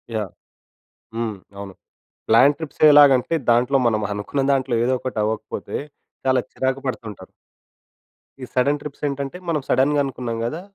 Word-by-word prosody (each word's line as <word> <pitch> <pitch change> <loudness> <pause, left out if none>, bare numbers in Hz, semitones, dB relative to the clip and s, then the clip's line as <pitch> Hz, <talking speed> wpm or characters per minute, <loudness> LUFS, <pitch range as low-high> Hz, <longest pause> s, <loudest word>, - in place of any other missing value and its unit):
Yeah! 105 -3 -2 0.9
హ్మ్. 115 -2 -2 0.2
అవును 100 -1 -8 0.5
plan 130 +6 +6
trips 160 -3 -8
ఎలాగంటే, 145 0 +6 0.2
దాంట్లో 120 +4 +3
మనం 110 -2 +1
అనుకున్న 105 +7 -2
దాంట్లో 130 -3 0
ఏదో 125 - +1
ఒకటి 130 -4 -5
అవ్వకపోతే, 105 -3 -4 0.5
చాలా 130 -1 +3
చిరాకు 130 +1 -2
పడుతుంటారు. 110 -6 -6 1.1
ఈ - - -4
సడన్ 140 +3 +1
ట్రిప్స్ 150 -1 -9
ఏంటంటే 140 +4 -4
మనం 155 -3 0
సడెన్‌గ 145 +3 +3
అనుకున్నాం 125 -4 -4
గదా! 155 +8 -4
130 Hz, 135 wpm, -21 LUFS, 115-140 Hz, 1.1 s, plan